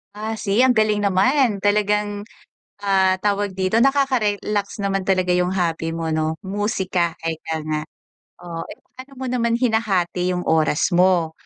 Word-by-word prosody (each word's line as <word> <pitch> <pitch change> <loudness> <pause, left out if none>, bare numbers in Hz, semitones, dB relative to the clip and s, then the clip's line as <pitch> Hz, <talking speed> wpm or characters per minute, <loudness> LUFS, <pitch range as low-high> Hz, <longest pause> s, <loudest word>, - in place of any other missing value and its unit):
Ah. 220 +1 -4
See, 205 +1 -1
ang 255 -1 +5
galing 215 -1 +2
naman. 205 +2 +2
Talagang, 205 0 0 0.6
ah, 190 -1 +3
tawag 200 -1 0
dito, 190 +4 +1
nakaka-relax 235 -7 +1
naman 195 -1 -1
talaga 185 -2 +2
'yung 180 +1 +1
hobby 165 -2 -1
mo, 165 -1 -3
'no? 155 0 0
Musika, 190 -3 -1
ika 160 -1 -4
nga. 155 -1 -2 0.6
Oo. 170 -1 -6 0.3
Paano 260 +2 -12
mo 260 0 -6
naman 235 -2 +1
hinahati 190 -7 0
'yung 180 - -3
oras 160 +2 +1
mo, 175 -2 +3
195 Hz, 140 wpm, -21 LUFS, 175-215 Hz, 0.6 s, ang